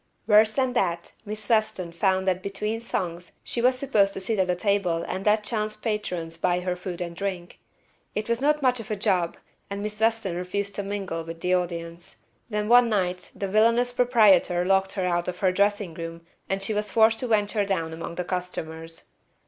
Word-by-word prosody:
Worse 215 Hz, 0 st, +6 dB
than 260 Hz, -2 st, +1 dB
that, 175 Hz, -7 st, -1 dB
Miss 210 Hz, 0 st, -5 dB
Weston 215 Hz, -6 st, +1 dB
found 190 Hz, +2 st, +1 dB
that 185 Hz, -1 st, +1 dB
between 210 Hz, +3 st, -3 dB
songs 175 Hz, -6 st, -4 dB
she 235 Hz, -, -3 dB
was 255 Hz, +1 st, +3 dB
supposed 215 Hz, -8 st, +2 dB
to -, -, -3 dB
sit 210 Hz, +2 st, -1 dB
at 185 Hz, -1 st, +2 dB
a 180 Hz, -, +2 dB
table 180 Hz, -4 st, 0 dB
and 190 Hz, +3 st, -4 dB
let 210 Hz, 0 st, +4 dB
chance 215 Hz, -1 st, -2 dB
patrons 185 Hz, -7 st, -3 dB
buy 180 Hz, +1 st, +1 dB
her 180 Hz, 0 st, -1 dB
food 180 Hz, -1 st, -5 dB
and 170 Hz, -1 st, -4 dB
drink. 185 Hz, -2 st, -5 dB, 0.6 s
It 215 Hz, -, -2 dB
was 235 Hz, +1 st, 0 dB
not 300 Hz, +1 st, +2 dB
much 250 Hz, -1 st, +3 dB
of 225 Hz, -1 st, -8 dB
a 215 Hz, -, 0 dB
job 190 Hz, -4 st, 0 dB, 0.3 s
and 200 Hz, 0 st, -4 dB
Miss 210 Hz, 0 st, -4 dB
Weston 225 Hz, -5 st, +1 dB
refused 200 Hz, +3 st, -3 dB
to -, -, -3 dB
mingle 195 Hz, -4 st, -4 dB
with 165 Hz, 0 st, -8 dB
the 180 Hz, 0 st, +1 dB
audience. 170 Hz, -1 st, -3 dB, 0.3 s
Then 210 Hz, -1 st, -1 dB
one 240 Hz, +1 st, +6 dB
night 180 Hz, -4 st, -1 dB
the 200 Hz, -, -3 dB
villainous 230 Hz, +4 st, +3 dB
proprietor 210 Hz, -8 st, +4 dB
locked 190 Hz, 0 st, +2 dB
her 190 Hz, -2 st, -1 dB
out 175 Hz, -1 st, 0 dB
of 180 Hz, -, -3 dB
her 190 Hz, -2 st, +2 dB
dressing 200 Hz, -1 st, +1 dB
room 165 Hz, 0 st, -7 dB, 0.2 s
and 195 Hz, 0 st, -1 dB
she 215 Hz, -, 0 dB
was 210 Hz, 0 st, -1 dB
forced 225 Hz, 0 st, +4 dB
to 250 Hz, -, -1 dB
venture 210 Hz, -1 st, +1 dB
down 165 Hz, -5 st, -2 dB
among 165 Hz, +1 st, -6 dB
the 180 Hz, -, -2 dB
customers. 165 Hz, -3 st, -5 dB
195 Hz, 200 wpm, -25 LUFS, 180-215 Hz, 0.6 s, Worse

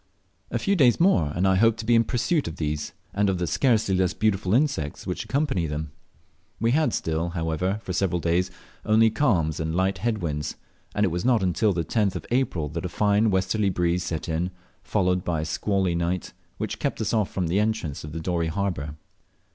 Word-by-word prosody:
A -, -, -1 dB
few 200 Hz, -1 st, +1 dB
days 130 Hz, -, +4 dB
more 165 Hz, -, +3 dB
and 90 Hz, +3 st, +2 dB
I 95 Hz, -, +4 dB
hoped 115 Hz, +2 st, +4 dB
to -, -, -9 dB
be 120 Hz, -, +3 dB
in 115 Hz, 0 st, +5 dB
pursuit 130 Hz, +6 st, 0 dB
of 80 Hz, -, -5 dB
these, 75 Hz, -1 st, -3 dB, 0.2 s
and 100 Hz, 0 st, +2 dB
of 95 Hz, -, 0 dB
the 90 Hz, -, -1 dB
scarcely 110 Hz, -, +2 dB
less 95 Hz, 0 st, +1 dB
beautiful 95 Hz, -4 st, 0 dB
insects 135 Hz, -, 0 dB
which -, -, -3 dB
accompany 135 Hz, -, 0 dB
them. 75 Hz, 0 st, -4 dB, 0.7 s
We 115 Hz, +2 st, +2 dB
had 155 Hz, +4 st, +2 dB
still, 80 Hz, +1 st, -1 dB
however, 85 Hz, +4 st, -1 dB
for 90 Hz, -, -4 dB
several 90 Hz, -1 st, +1 dB
days 85 Hz, +2 st, +1 dB, 0.3 s
only 110 Hz, +1 st, +4 dB
calms 95 Hz, -, +1 dB
and 80 Hz, 0 st, -2 dB
light 95 Hz, +1 st, +1 dB
head 115 Hz, +3 st, 0 dB
winds, 75 Hz, -5 st, -3 dB, 0.4 s
and 105 Hz, -, +2 dB
it 100 Hz, -, +3 dB
was 85 Hz, +1 st, -2 dB
not 120 Hz, -4 st, +3 dB
till 110 Hz, +3 st, +2 dB
the 85 Hz, -2 st, -2 dB
10th 105 Hz, -5 st, +1 dB
of -, -, -5 dB
April 115 Hz, -, 0 dB
that 80 Hz, +2 st, -5 dB
a -, -, -2 dB
fine 105 Hz, +4 st, +2 dB
westerly 95 Hz, +2 st, +1 dB
breeze 90 Hz, -1 st, 0 dB
set 80 Hz, -3 st, -4 dB
in, 85 Hz, +2 st, -1 dB, 0.3 s
followed 90 Hz, -3 st, 0 dB
by 80 Hz, -3 st, -1 dB
a -, -, -3 dB
squally 95 Hz, +2 st, 0 dB
night, 85 Hz, +1 st, -2 dB, 0.2 s
which -, -, -4 dB
kept -, -, -2 dB
us -, -, -1 dB
off 110 Hz, -4 st, 0 dB
the 90 Hz, +2 st, +1 dB
entrance 105 Hz, -9 st, -1 dB
of 75 Hz, +2 st, -6 dB
Dorey 85 Hz, -2 st, 0 dB
harbour. 80 Hz, -5 st, -2 dB
95 Hz, 205 wpm, -25 LUFS, 85-110 Hz, 0.7 s, in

